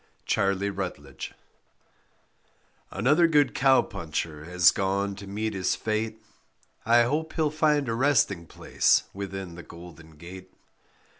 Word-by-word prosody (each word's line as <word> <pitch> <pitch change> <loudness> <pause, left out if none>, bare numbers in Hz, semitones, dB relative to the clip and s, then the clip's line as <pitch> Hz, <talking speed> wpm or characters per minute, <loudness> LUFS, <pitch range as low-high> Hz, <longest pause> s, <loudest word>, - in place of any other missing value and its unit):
CHARLIE 100 +1 0
RUTLAGE 90 -8 -6 1.6
Another 145 - +3
good 150 -3 +3
cow 135 0 +4
puncher 80 -2 -5
has 90 0 +5
gone 100 +1 -1
to 100 0 -10
meet 110 +2 -3
his 95 -1 0
fate, 110 0 -3 0.7
I 120 +1 +6
hope 150 +6 -2
he'll 155 -2 0
find 150 -2 +1
a 115 - -1
resting 115 - +1
place - - +2
within 95 -2 -6
the 85 - -9
golden 85 -2 -13
gate. 90 +4 -12
100 Hz, 125 wpm, -26 LUFS, 90-125 Hz, 1.6 s, I